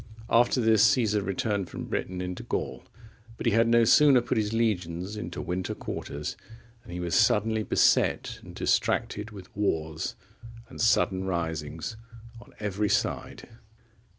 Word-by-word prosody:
After 120 +2 +4
this, 110 -3 +4
Caesar 115 -4 +3
returned 100 0 -2
from - - -6
Britain 90 0 -3
into 90 0 -5
Gaul, 65 - -4 0.5
but - - -6
he 115 - +3
had 115 +2 +4
no 115 0 +5
sooner 140 +3 +6
put 120 - -2
his 105 -1 -1
legions 95 -4 -1
into 85 -5 -5
winter 90 +1 -3
quarters, 75 +1 -5 0.5
than 115 - -13
he 90 - -5
was 85 -2 -3
suddenly 110 +1 +3
beset - - +2
and - - -12
distracted 105 +2 0
with 100 -4 -12
wars 80 -6 -2 0.5
and 130 - -7
sudden 95 -5 +2
risings 80 +1 -3 0.4
on - - -18
every 105 0 -1
side. - - -1
100 Hz, 145 wpm, -27 LUFS, 90-115 Hz, 0.5 s, sooner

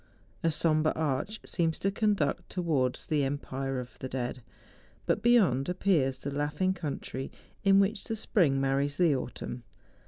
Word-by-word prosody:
A 165 - +3
sombre 155 -1 +2
arch 160 +8 -2
seems 165 -2 +1
to 195 - 0
conduct 200 -7 0
towards 145 -9 0
the 150 -2 +1
empire 135 -1 -3
of 125 0 -9
the 130 - -5
dead. 125 0 -3 0.6
But - - +1
beyond 190 - +4
appears 175 -8 +1
the 140 - -5
laughing^country 145 -2 -2 0.3
in 195 -1 +6
which 200 +1 +1
the 225 - -2
spring 175 - +2
marries 140 +1 0
the 170 -5 +4
autumn. 125 -1 -5
150 Hz, 145 wpm, -29 LUFS, 135-185 Hz, 0.6 s, in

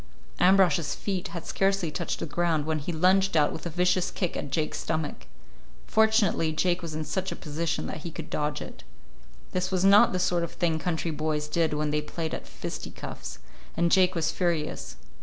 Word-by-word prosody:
Ambrosch's 180 -5 +4
feet 190 -3 -3
had 170 0 -7
scarcely 195 -4 +1
touched - - -3
the - - -1
ground 165 -1 0
when 155 -1 0
he 145 +5 -4
lunged 185 +2 +3
out 150 -1 +3
with 160 - -5
a - - -3
vicious 180 +2 +2
kick 180 -4 -2
at 145 - -4
Jake's 155 +3 -1
stomach. 150 - -3 0.6
Fortunately 220 -7 +3
Jake 175 +3 +1
was 165 -3 -5
in 155 0 -3
such 190 +3 -2
a - - -3
position 160 +1 -3
that - - -4
he 160 +2 -6
could 160 -1 -8
dodge 150 0 -1
it. - - -11 0.7
This 185 0 -1
was 190 0 +1
not 205 +4 +7
the 185 - 0
sort 180 -1 +1
of 170 - -4
thing 165 -2 0
country 165 0 -1
boys 150 0 -1
did 160 0 +1
when 150 0 0
they 150 0 +1
played 160 +1 -4
at - - -5
fisticuffs, - - -7 0.4
and 170 0 +2
Jake 185 0 +4
was 160 -1 +1
furious. 160 - -2
170 Hz, 195 wpm, -27 LUFS, 155-180 Hz, 0.7 s, not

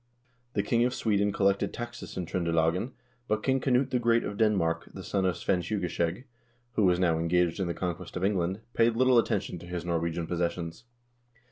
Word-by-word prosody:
The - - +1
king 120 -1 +2
of 125 +1 +1
Sweden 105 -2 +1
collected 100 0 +1
taxes 120 0 -7
in 90 - -2
Tr0nde 85 0 -1
lagen, 85 +10 +1 0.3
but 110 0 0
King 135 -1 +2
Knut 130 0 +2
the 125 - +2
Great 115 0 +3
of 100 - -4
Denmark, 100 -7 +1
the - - -7
son 95 -2 0
of 90 -2 0
Svein 90 +1 +1
Tjuge 95 +3 -2
skjeg, 85 +5 -1 0.5
who 105 - +3
was 90 -1 +4
now 85 -3 +2
engaged 85 +1 +1
in 95 - 0
the 85 - -2
conquest 90 -1 -4
of 90 - -3
England, 95 0 0
paid 115 0 +3
little 130 0 +5
attention 95 -5 -1
to 85 - -11
his 90 -1 -4
Norwegian 85 0 -1
possessions. 85 +3 -3
95 Hz, 200 wpm, -29 LUFS, 85-115 Hz, 0.5 s, little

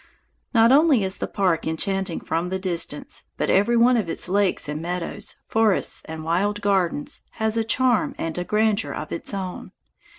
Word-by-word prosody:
Not 230 -1 +5
only 285 -5 +5
is 190 0 -3
the - - -2
park 180 -6 0
enchanting 190 +2 -1
from 170 +2 -2
the 190 - -1
distance, 170 -5 -3
but - - 0
every 230 +5 +3
one 240 +1 +5
of 205 -7 -1
its - - -2
lakes 195 -2 +1
and 150 +1 -4
meadows, 175 0 -4
forests 220 -3 +2
and 160 0 -7
wild 195 +6 0
gardens, 190 -7 0
has 220 0 0
a 225 - +2
charm 245 +1 +1
and 165 -1 -3
a - - -1
grandeur 215 +2 +1
of 155 - -6
its 170 - -3
own. 190 -2 -5
195 Hz, 175 wpm, -23 LUFS, 170-220 Hz, -, Not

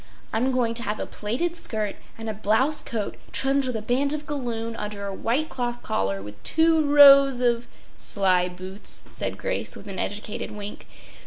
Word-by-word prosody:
I’m 245 +4 +1
going 245 -3 +1
to 230 - +1
have 210 -2 -3
a - - -2
plaited 255 +12 -2
skirt 215 - -2 0.2
and 225 0 -7
a 220 - -2
blouse 220 +8 +2
coat 215 -3 -4
trimmed 270 0 +2
with 250 - -3
a 220 - -3
band 270 +5 +1
of 300 0 -6
galloon 235 -6 -3
under 210 -1 -5
a 200 - -4
white 250 +10 0
cloth 240 -1 -3
collar 95 0 -1
with 105 0 -11
two 320 0 +3
rows 275 -2 +8
of—” 240 -1 +1 0.3
“Sly 185 -3 +2
boots!” 185 +3 -3
said - - -3
Grace - - -2
with - - -11
an 195 -3 -6
educated 210 +1 -3
wink. 210 0 -8
230 Hz, 180 wpm, -25 LUFS, 205-275 Hz, 0.3 s, rows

